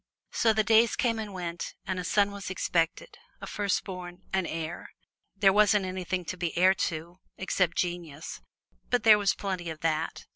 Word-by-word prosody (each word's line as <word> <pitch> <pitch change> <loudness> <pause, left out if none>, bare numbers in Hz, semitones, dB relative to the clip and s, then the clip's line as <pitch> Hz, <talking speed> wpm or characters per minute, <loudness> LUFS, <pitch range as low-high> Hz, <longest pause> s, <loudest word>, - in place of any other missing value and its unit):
So 225 - +3
the 220 0 +2
days 225 +1 +4
came 230 -2 +1
and 215 -2 -5
went, 175 -2 -5
and 185 0 -2
a - - -3
son 200 +2 +2
was 200 -2 -6
expected 175 - -1 0.2
a - - -7
firstborn 185 -3 -3
an 190 -3 +1
heir. 165 +1 -5 0.5
There 195 -1 +5
wasn't 210 -1 +4
anything 185 -1 -3
to 185 - -5
be 175 -2 -3
heir 185 +2 +6 0.2
to 170 +2 -8 0.2
except 185 -2 0
genius, 170 -4 -4 0.5
but 245 -3 +1
there 215 -2 +7
was 200 -1 +2
plenty 185 -4 -3
of 160 -1 -7
that. 160 0 -1
185 Hz, 175 wpm, -28 LUFS, 175-205 Hz, 0.5 s, there